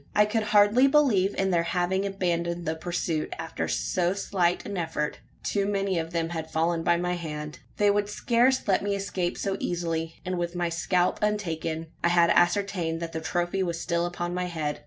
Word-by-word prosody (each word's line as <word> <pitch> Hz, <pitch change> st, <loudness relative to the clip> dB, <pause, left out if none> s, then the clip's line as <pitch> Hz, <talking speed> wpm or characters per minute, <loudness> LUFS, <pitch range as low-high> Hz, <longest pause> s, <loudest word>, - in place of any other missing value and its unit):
I 210 Hz, -, +6 dB
could 220 Hz, +1 st, 0 dB
hardly 210 Hz, +5 st, +5 dB
believe 245 Hz, -10 st, +3 dB
in 195 Hz, 0 st, +1 dB
their 170 Hz, -1 st, +3 dB
having 180 Hz, +3 st, 0 dB
abandoned 175 Hz, -3 st, -1 dB
the 160 Hz, -, 0 dB
pursuit, 160 Hz, -1 st, -2 dB
after 165 Hz, 0 st, -4 dB
so 180 Hz, 0 st, 0 dB
slight 180 Hz, -3 st, 0 dB
an 205 Hz, -, -5 dB
effort. 160 Hz, -4 st, -2 dB, 0.2 s
Too 200 Hz, -1 st, 0 dB
many 195 Hz, -3 st, 0 dB
of 165 Hz, 0 st, -3 dB
them 165 Hz, -1 st, -1 dB
had 160 Hz, -2 st, -5 dB
fallen 165 Hz, +1 st, 0 dB
by 170 Hz, +1 st, +3 dB
my 180 Hz, +1 st, -1 dB
hand. 150 Hz, -3 st, -5 dB, 0.2 s
They 205 Hz, -1 st, +4 dB
would 205 Hz, 0 st, 0 dB
scarce 240 Hz, +4 st, +2 dB
let 195 Hz, -, +3 dB
me 200 Hz, 0 st, -1 dB
escape 190 Hz, -3 st, -2 dB
so 195 Hz, -1 st, -2 dB
easily, 165 Hz, -2 st, -2 dB
and 180 Hz, -1 st, -2 dB
with 175 Hz, 0 st, -3 dB
my 175 Hz, -1 st, 0 dB
scalp 175 Hz, +1 st, +1 dB
untaken: 165 Hz, -6 st, -1 dB, 0.2 s
I -, -, +4 dB
had 170 Hz, -1 st, +4 dB
ascertained 175 Hz, -2 st, +2 dB
that 165 Hz, -1 st, -5 dB
the 160 Hz, -, -4 dB
trophy 175 Hz, +3 st, -1 dB
was 170 Hz, -2 st, -1 dB
still 170 Hz, 0 st, 0 dB
upon 175 Hz, 0 st, -4 dB
my 180 Hz, 0 st, -1 dB
head. 155 Hz, -4 st, -3 dB
175 Hz, 195 wpm, -27 LUFS, 170-195 Hz, 0.2 s, I